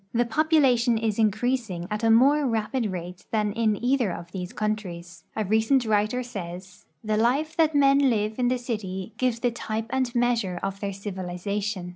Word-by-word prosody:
The 240 Hz, +1 st, +3 dB
population 255 Hz, -4 st, +3 dB
is 220 Hz, -1 st, -1 dB
increasing 220 Hz, -4 st, 0 dB
at 210 Hz, +1 st, -2 dB
a 225 Hz, -, +4 dB
more 275 Hz, +6 st, +5 dB
rapid 225 Hz, +1 st, -1 dB
rate 180 Hz, -1 st, -7 dB
than 210 Hz, -2 st, 0 dB
in 220 Hz, -2 st, +1 dB
either 250 Hz, -6 st, +2 dB
of 170 Hz, 0 st, -8 dB
these 180 Hz, -1 st, -5 dB
countries. 180 Hz, -6 st, -4 dB
A 215 Hz, -, -1 dB
recent 220 Hz, +6 st, +2 dB
writer 215 Hz, +3 st, +1 dB
says: 185 Hz, -5 st, -8 dB
" 155 Hz, -, -47 dB
The 215 Hz, -1 st, 0 dB
life 275 Hz, +8 st, +1 dB
that 320 Hz, -2 st, +3 dB
men 275 Hz, -1 st, +5 dB
live 215 Hz, 0 st, -1 dB
in 245 Hz, -, +2 dB
the 250 Hz, +1 st, +1 dB
city 210 Hz, -5 st, -5 dB
gives 245 Hz, -2 st, 0 dB
the 245 Hz, -, +2 dB
type 220 Hz, -1 st, -4 dB
and 260 Hz, -2 st, -1 dB
measure 230 Hz, -7 st, +1 dB
of 195 Hz, 0 st, -3 dB
their 200 Hz, -1 st, -3 dB
civilization. 195 Hz, 0 st, -4 dB
220 Hz, 180 wpm, -25 LUFS, 195-245 Hz, -, more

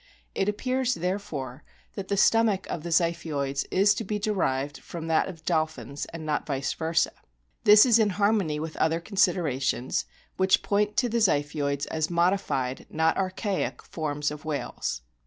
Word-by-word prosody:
It 195 Hz, -, 0 dB
appears, 255 Hz, +3 st, 0 dB
therefore, 165 Hz, -8 st, -4 dB, 0.3 s
that 195 Hz, -2 st, -6 dB
the 200 Hz, -, -1 dB
stomach 220 Hz, -2 st, +3 dB
of 160 Hz, -, -3 dB
the 170 Hz, -, -6 dB
Ziphioids 160 Hz, -5 st, 0 dB
is 200 Hz, +2 st, +4 dB
to 225 Hz, -, -4 dB
be 210 Hz, +1 st, -2 dB
derived 145 Hz, -10 st, -1 dB
from 165 Hz, -2 st, -7 dB
that 160 Hz, -, +3 dB
of 165 Hz, -4 st, -10 dB
dolphins, 155 Hz, -4 st, -1 dB
and 165 Hz, -1 st, -8 dB
not 150 Hz, -1 st, -1 dB
vice 135 Hz, -2 st, -1 dB
versa. 160 Hz, 0 st, +1 dB, 0.5 s
This 210 Hz, +2 st, +9 dB
is 235 Hz, -2 st, +5 dB
in 215 Hz, -2 st, +3 dB
harmony 200 Hz, -7 st, +2 dB
with 160 Hz, 0 st, -5 dB
other 160 Hz, +1 st, +2 dB
considerations, 170 Hz, -, 0 dB, 0.3 s
which 190 Hz, 0 st, +3 dB
point 210 Hz, 0 st, 0 dB
to 250 Hz, -, +3 dB
the 235 Hz, 0 st, 0 dB
Ziphioids 145 Hz, -6 st, +1 dB
as 160 Hz, 0 st, -1 dB
modified, 170 Hz, -7 st, 0 dB
not 160 Hz, +1 st, +1 dB
archaic, 190 Hz, +1 st, -2 dB
forms 150 Hz, -2 st, -3 dB
of 150 Hz, 0 st, -8 dB
whales. 140 Hz, -, -3 dB
170 Hz, 155 wpm, -27 LUFS, 150-200 Hz, 0.5 s, This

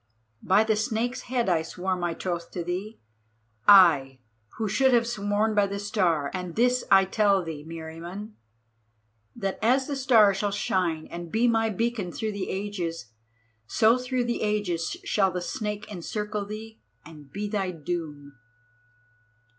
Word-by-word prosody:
By 195 Hz, +3 st, +4 dB
the 220 Hz, 0 st, +1 dB
Snake's 225 Hz, +3 st, -1 dB
head 245 Hz, -3 st, 0 dB
I 170 Hz, -3 st, +2 dB
swore 185 Hz, +3 st, -3 dB
my 175 Hz, -2 st, -2 dB
troth 175 Hz, -1 st, -4 dB
to 175 Hz, -, -3 dB
thee, 190 Hz, +6 st, -5 dB, 0.7 s
I, 155 Hz, -10 st, +7 dB, 0.4 s
who 220 Hz, -1 st, -1 dB
should 265 Hz, +4 st, +3 dB
have 235 Hz, 0 st, +3 dB
sworn 215 Hz, -1 st, 0 dB
by 205 Hz, -1 st, +3 dB
the 200 Hz, 0 st, -4 dB
Star; 180 Hz, -8 st, 0 dB
and 180 Hz, -2 st, -5 dB
this 250 Hz, +2 st, +2 dB
I 195 Hz, 0 st, +6 dB
tell 200 Hz, -1 st, +2 dB
thee, 160 Hz, -3 st, -6 dB
Meriamun, 165 Hz, +6 st, -8 dB, 1.0 s
that 195 Hz, -1 st, -3 dB
as 255 Hz, +4 st, +3 dB
the 285 Hz, -, -3 dB
Star 230 Hz, -7 st, +5 dB
shall 205 Hz, +2 st, -1 dB
shine 185 Hz, -5 st, -1 dB
and 170 Hz, -1 st, -7 dB
be 230 Hz, +2 st, +2 dB
my 225 Hz, -1 st, +2 dB
beacon 220 Hz, -3 st, -2 dB
through 220 Hz, +2 st, -3 dB
the 200 Hz, -2 st, -4 dB
ages, 175 Hz, -, -4 dB, 0.6 s
so 225 Hz, +3 st, +4 dB
through 250 Hz, 0 st, -1 dB
the 240 Hz, 0 st, -2 dB
ages 210 Hz, -, -1 dB
shall 205 Hz, -, +2 dB
the 180 Hz, 0 st, -3 dB
Snake 210 Hz, +2 st, -4 dB
encircle 210 Hz, +2 st, -4 dB
thee 220 Hz, +1 st, -8 dB, 0.3 s
and 150 Hz, -3 st, -13 dB
be 205 Hz, +1 st, -4 dB
thy 200 Hz, -3 st, -1 dB
doom!" 155 Hz, -4 st, -5 dB
200 Hz, 155 wpm, -26 LUFS, 175-220 Hz, 1.0 s, I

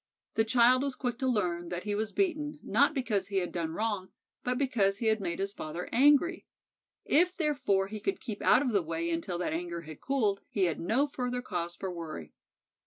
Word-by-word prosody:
The 220 Hz, -, +3 dB
child 245 Hz, +3 st, +5 dB
was 275 Hz, -2 st, -2 dB
quick 245 Hz, -2 st, -3 dB
to 260 Hz, -, 0 dB
learn 175 Hz, -8 st, 0 dB
that 175 Hz, 0 st, -4 dB
he 210 Hz, -, -2 dB
was 215 Hz, +1 st, -1 dB
beaten, 305 Hz, -6 st, -1 dB
not 285 Hz, +2 st, +3 dB
because 215 Hz, -8 st, 0 dB
he 200 Hz, -, -6 dB
had 180 Hz, -2 st, 0 dB
done 165 Hz, -2 st, -3 dB
wrong, 205 Hz, -3 st, -2 dB, 0.3 s
but 250 Hz, 0 st, 0 dB
because 210 Hz, -8 st, +1 dB
he 230 Hz, -, -4 dB
had 220 Hz, -1 st, +2 dB
made 170 Hz, -3 st, -2 dB
his 195 Hz, +1 st, -2 dB
father 160 Hz, +1 st, -5 dB
angry. 290 Hz, +7 st, +4 dB, 0.6 s
If, 360 Hz, +4 st, +3 dB
therefore, 275 Hz, -, +1 dB
he 210 Hz, +2 st, -6 dB
could 390 Hz, -, -2 dB
keep 215 Hz, -5 st, -6 dB
out 265 Hz, -, +5 dB
of 255 Hz, -, 0 dB
the 200 Hz, -3 st, +3 dB
way 165 Hz, +1 st, -2 dB
until 170 Hz, +2 st, -2 dB
that 175 Hz, -, -2 dB
anger 170 Hz, 0 st, -3 dB
had 155 Hz, -2 st, -11 dB
cooled, 220 Hz, -8 st, +1 dB
he 200 Hz, -, 0 dB
had 170 Hz, -4 st, +1 dB
no 225 Hz, +11 st, +2 dB
further 250 Hz, -3 st, -3 dB
cause 175 Hz, -5 st, -3 dB
for 190 Hz, -1 st, -4 dB
worry. 155 Hz, -, -7 dB
210 Hz, 210 wpm, -30 LUFS, 175-255 Hz, 0.6 s, child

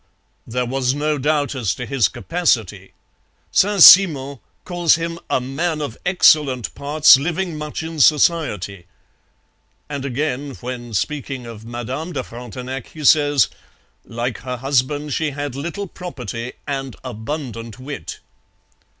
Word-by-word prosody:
There 125 Hz, +2 st, -1 dB
was 130 Hz, +1 st, 0 dB
no 150 Hz, 0 st, -1 dB
doubt 145 Hz, +1 st, 0 dB
as 120 Hz, -8 st, -1 dB
to 125 Hz, -, -5 dB
his 130 Hz, -6 st, +2 dB
capacity. 110 Hz, -, -1 dB, 0.6 s
Saint 200 Hz, -2 st, +4 dB
Simon 140 Hz, -8 st, +7 dB, 0.3 s
calls 175 Hz, -2 st, +3 dB
him 165 Hz, 0 st, -4 dB
'a -, -, +2 dB
man 155 Hz, +6 st, -2 dB
of 145 Hz, -6 st, -4 dB
excellent 150 Hz, -, +3 dB
parts, 145 Hz, 0 st, +5 dB
living 170 Hz, +4 st, -2 dB
much 150 Hz, +1 st, -5 dB
in 160 Hz, -1 st, -6 dB
society.' 130 Hz, -, +2 dB, 1.0 s
And 140 Hz, -2 st, -5 dB
again, 140 Hz, 0 st, -3 dB
when 120 Hz, -2 st, -6 dB
speaking 135 Hz, +3 st, -3 dB
of 115 Hz, -2 st, -10 dB
Madame 125 Hz, +8 st, -5 dB
de 130 Hz, -3 st, -2 dB
Frontenac, 125 Hz, +2 st, -7 dB
he 155 Hz, -, -10 dB
says: 145 Hz, -2 st, +5 dB, 0.6 s
'Like 120 Hz, +1 st, -4 dB
her 125 Hz, -1 st, -5 dB
husband 140 Hz, +3 st, 0 dB
she 155 Hz, +2 st, 0 dB
had 145 Hz, -1 st, -5 dB
little 170 Hz, +8 st, -4 dB
property 125 Hz, -, -7 dB
and 135 Hz, -3 st, -4 dB
abundant 115 Hz, -2 st, -6 dB
wit.' 135 Hz, +2 st, -7 dB
140 Hz, 130 wpm, -20 LUFS, 125-155 Hz, 1.0 s, Simon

